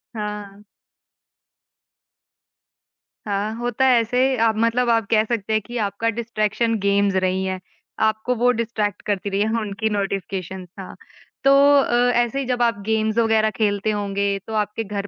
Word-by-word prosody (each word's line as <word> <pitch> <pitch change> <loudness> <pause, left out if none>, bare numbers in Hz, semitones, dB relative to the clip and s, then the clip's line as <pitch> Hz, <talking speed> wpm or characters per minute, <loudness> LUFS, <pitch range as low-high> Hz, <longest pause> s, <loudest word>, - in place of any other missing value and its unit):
हाँ। 210 -1 -6 2.6
हाँ, 205 +1 -2
होता 245 +2 0
है 250 -2 +5
ऐसे, 250 +3 +1
आप 225 -1 +2
मतलब 230 +2 +1
आप 230 -2 +2
कह 215 -1 +4
सकते 220 -2 -2
हैं 215 - +2
कि 240 +4 -7
आपका 200 +3 -2
डिस्ट्रैक्शन 230 0 -1
गेम्स 200 0 +1
रही 185 0 0
हैं, 190 0 -3 0.4
आपको 220 +3 +1
वो 245 +2 +3
डिस्ट्रैक्ट 220 -4 -2
करती 200 -1 -2
रही 200 +1 -1
हैं, 220 - +1
उनकी 210 +1 -2
नोटिफिकेशंस। 190 -2 -4
हाँ, 190 - -8 0.5
तो 275 - +5 0.3
अ, 245 -1 +2
ऐसे 240 +3 +1
ही 275 - -2
जब 245 -1 -1
आप 230 -3 +1
गेम्स 220 0 0
वग़ैरह 220 -1 +3
खेलते 205 0 +1
होंगे, 200 -1 -1
तो 220 - -6
आपके 210 +1 -1
घर 200 -1 -5
215 Hz, 155 wpm, -22 LUFS, 200-230 Hz, 2.6 s, है